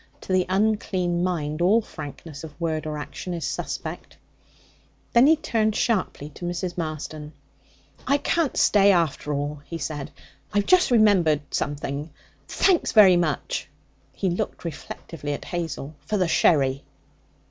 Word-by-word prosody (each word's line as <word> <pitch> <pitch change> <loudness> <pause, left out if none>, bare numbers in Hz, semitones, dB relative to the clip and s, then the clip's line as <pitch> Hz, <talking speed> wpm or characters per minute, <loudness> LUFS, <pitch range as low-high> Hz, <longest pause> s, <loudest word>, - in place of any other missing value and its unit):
To 190 - -3
the 185 -1 +2
unclean 190 -3 +1
mind 155 -3 -2
all 195 +6 +5
frankness 150 - -9
of 155 0 -10
word 160 -2 -2
or 150 -1 -3
action 175 +4 -6
is 165 - -4
suspect. - - -5 1.0
Then 240 +3 +7
he 320 - +7
turned 220 -7 0
sharply 185 - -1
to 165 +4 -9
Mrs. 175 0 -3
Marston. 155 -2 -5 0.7
'I 280 - +4
can't 315 0 0
stay, 200 -1 +5
after 165 -4 0
all,' 145 0 -3
he 165 - -6
said; 150 -3 -4 0.4
'I've 205 -1 +2
just 365 -1 +5
remembered 200 - +4
something. 145 +1 -3 0.4
Thanks 370 -4 +2
very 200 -5 +8
much' 165 -5 -1 0.4
he 190 -3 -1
looked 175 - -3
reflectively 150 -1 -6
at - - -6
Hazel 160 -4 -4
for 215 - 0
the 185 -3 +2
sherry.' 140 -5 +3
170 Hz, 140 wpm, -24 LUFS, 150-200 Hz, 1.0 s, very